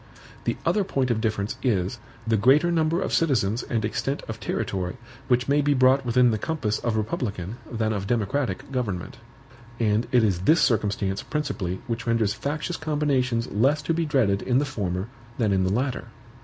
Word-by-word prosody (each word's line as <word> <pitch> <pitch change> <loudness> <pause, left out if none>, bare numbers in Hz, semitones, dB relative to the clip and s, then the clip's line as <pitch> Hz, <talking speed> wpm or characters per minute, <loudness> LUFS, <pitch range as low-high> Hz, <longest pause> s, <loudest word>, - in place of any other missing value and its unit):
The - - 0
other 210 - +2
point 130 -8 0
of 110 -1 0
difference 110 -2 -1
is, 100 -7 0 0.3
the 115 -1 +2
greater 135 +11 +4
number 165 0 +2
of - - -2
citizens 120 -8 +2
and 115 -3 -2
extent 135 +6 -2
of 110 0 -6
territory 90 -1 -3 0.3
which 125 -1 +2
may 145 +1 +3
be 145 0 +2
brought 130 +1 +4
within 125 0 +4
the 110 - -1
compass 115 -10 -1
of 120 -2 -1
republican 105 - -3
than 110 -2 0
of 100 -2 -3
democratic 120 0 -1
government; 105 -9 -3 0.6
and 110 0 +1
it 125 -2 +4
is 95 -5 +2
this 155 - +4
circumstance 100 -4 +1
principally 120 - -3
which 120 -1 -4
renders 115 -3 +2
factious 150 +8 -3
combinations 135 -6 0
less 135 +9 +2
to 165 - 0
be 165 -1 0
dreaded 110 -9 +2
in 125 -1 +1
the 145 - +2
former 100 -7 -3 0.3
than 110 -4 +1
in 95 -1 +2
the 95 - 0
latter. 125 +4 -1
120 Hz, 180 wpm, -25 LUFS, 105-140 Hz, 0.6 s, greater